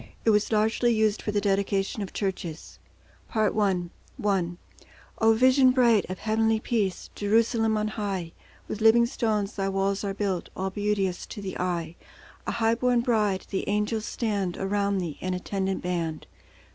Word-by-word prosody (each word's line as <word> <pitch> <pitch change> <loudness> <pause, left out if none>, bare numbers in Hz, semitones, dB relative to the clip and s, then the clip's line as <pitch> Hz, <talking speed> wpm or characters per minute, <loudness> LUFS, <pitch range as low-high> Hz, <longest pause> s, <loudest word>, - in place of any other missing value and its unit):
It 225 - +5
was 210 +1 +2
largely 220 +3 +2
used 215 -2 +2
for 210 - -2
the 205 - +1
dedication 200 0 0
of 195 - -5
churches. 185 -5 -4 0.5
Part 220 -2 +1
I. 195 -4 +2 0.4
I 190 -4 +2 0.7
O 225 0 +5
vision 255 +3 +5
bright 240 -6 +3
of 185 - -4
heavenly 220 +1 +1
peace, 210 -5 -2
Jerusalem 225 +1 +2
on 215 0 0
high, 195 -6 -3 0.4
With 215 - -5
living 225 +2 +6
stones 215 -4 -1
Thy 195 -1 -1
walls 195 +1 0
are 195 -1 -2
built, 195 -4 -2
All 190 +1 -2
beauteous 200 -2 -1
to - - -8
the 195 -2 -5
eye; 170 -2 -2 0.5
A - - 0
high 225 -1 +2
born 245 0 +2
bride, 210 -6 +1
the 195 - -2
angels 210 +2 0
stand 200 -6 -2
Around 200 +1 0
Thee, 170 -5 -4
an 185 0 -1
attendant 190 +1 -2
band. 170 -3 -2
205 Hz, 160 wpm, -26 LUFS, 190-220 Hz, 0.7 s, living